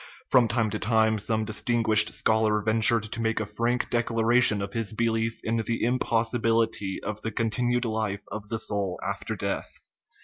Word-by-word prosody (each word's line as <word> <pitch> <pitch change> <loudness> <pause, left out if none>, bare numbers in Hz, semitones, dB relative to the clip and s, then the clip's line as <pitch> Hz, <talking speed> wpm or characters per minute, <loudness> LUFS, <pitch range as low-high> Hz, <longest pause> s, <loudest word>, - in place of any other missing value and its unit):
From 125 -3 +5
time 110 -1 0
to - - -3
time 110 0 +2
some 110 +1 -1
dis 110 -1 -3
tinguished 115 -3 +3
scholar 110 -1 +1
ventured 110 +1 +3
to 110 +2 -6
make 110 0 0
a 110 - -2
frank 115 +4 -1
declara 120 0 +2
tion 105 -4 +3
of 100 - -6
his 115 -2 -2
belief 115 0 -1
in 115 +1 -1
the 115 +1 -2
impossibility 115 -4 0
of 110 +1 -5
the 110 - -3
continued 120 +3 0
life 110 -3 -2
of 105 0 -7
the 115 - -1
soul 100 -4 -1
after - - -4
death. - - -4
110 Hz, 175 wpm, -26 LUFS, 110-115 Hz, -, From